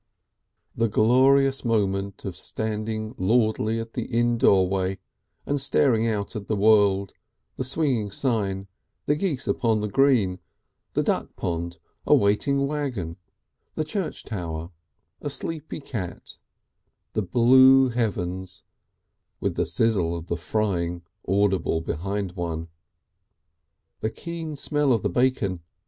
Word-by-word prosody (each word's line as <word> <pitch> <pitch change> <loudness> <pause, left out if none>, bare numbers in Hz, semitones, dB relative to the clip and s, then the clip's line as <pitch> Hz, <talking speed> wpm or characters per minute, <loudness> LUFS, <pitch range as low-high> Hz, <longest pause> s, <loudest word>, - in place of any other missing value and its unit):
The 115 - +2
glorious 135 +5 +4
moment 100 -4 -1
of - - -4
standing 110 0 -3
lordly 110 +2 +2
in 115 - -4
the - - -3
inn 120 -1 +1
doorway, 95 -2 +3 0.5
and 145 -1 0
staring 120 -4 +2
out 105 -3 -2
at 105 -2 -5
the 110 - 0
world, 100 -2 +3 0.4
the - - -3
swinging 130 -6 +1
sign, 100 -4 -1 0.4
the 145 - +2
geese 150 -5 -2
upon 115 -3 +1
the 105 - -2
green, 105 -6 +3 0.5
the - - +1
duck - - -1
pond, 85 0 -3 0.3
a - - +7
waiting 140 +8 +2
waggon, 130 - -3 0.6
the 155 - 0
church 165 +3 -4
tower, 85 -4 -5 0.5
a 145 - -3
sleepy 155 +2 -4
cat, 110 - -6 0.7
the 110 - 0
blue 130 +6 +6
heavens, 95 -7 -2 0.8
with - - -1
the - - -1
sizzle 95 -7 +1
of 85 0 -9
the 85 - 0
frying 85 -2 -1 0.2
audible 95 -3 +2
behind 95 +4 -3
one! 85 -2 -4 1.3
The 110 - -1
keen 165 +3 -6
smell 145 -1 +1
of 115 - 0
the 105 - 0
bacon! 120 -6 +1
110 Hz, 125 wpm, -25 LUFS, 95-130 Hz, 1.3 s, a